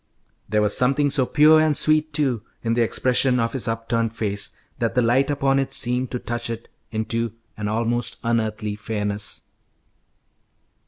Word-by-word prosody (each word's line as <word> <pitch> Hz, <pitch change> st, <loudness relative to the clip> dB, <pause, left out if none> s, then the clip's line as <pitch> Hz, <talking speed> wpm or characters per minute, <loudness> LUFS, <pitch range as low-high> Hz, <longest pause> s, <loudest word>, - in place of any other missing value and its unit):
There 105 Hz, +1 st, +2 dB
was 105 Hz, -, +2 dB
something 140 Hz, +3 st, +2 dB
so 135 Hz, -3 st, +1 dB
pure 155 Hz, 0 st, +6 dB
and 155 Hz, -2 st, +2 dB
sweet, 155 Hz, 0 st, +2 dB
too, 135 Hz, -7 st, 0 dB, 0.2 s
in 115 Hz, 0 st, +1 dB
the 120 Hz, -, +2 dB
expression 125 Hz, +2 st, +2 dB
of 115 Hz, -1 st, 0 dB
his 130 Hz, -2 st, +1 dB
upturned 115 Hz, 0 st, -1 dB
face 100 Hz, -3 st, -2 dB, 0.2 s
that -, -, -1 dB
the 125 Hz, -, +4 dB
light 130 Hz, +4 st, +3 dB
upon 135 Hz, -1 st, +2 dB
it 135 Hz, -, -1 dB
seemed 125 Hz, +1 st, -1 dB
to 125 Hz, -, -3 dB
touch 120 Hz, -1 st, -3 dB
it 115 Hz, 0 st, -6 dB, 0.2 s
into 115 Hz, 0 st, -2 dB, 0.2 s
an 105 Hz, -1 st, -4 dB
almost 115 Hz, +3 st, 0 dB
unearthly 110 Hz, -3 st, -1 dB
fairness. 105 Hz, -1 st, -4 dB
120 Hz, 160 wpm, -23 LUFS, 110-135 Hz, 0.2 s, pure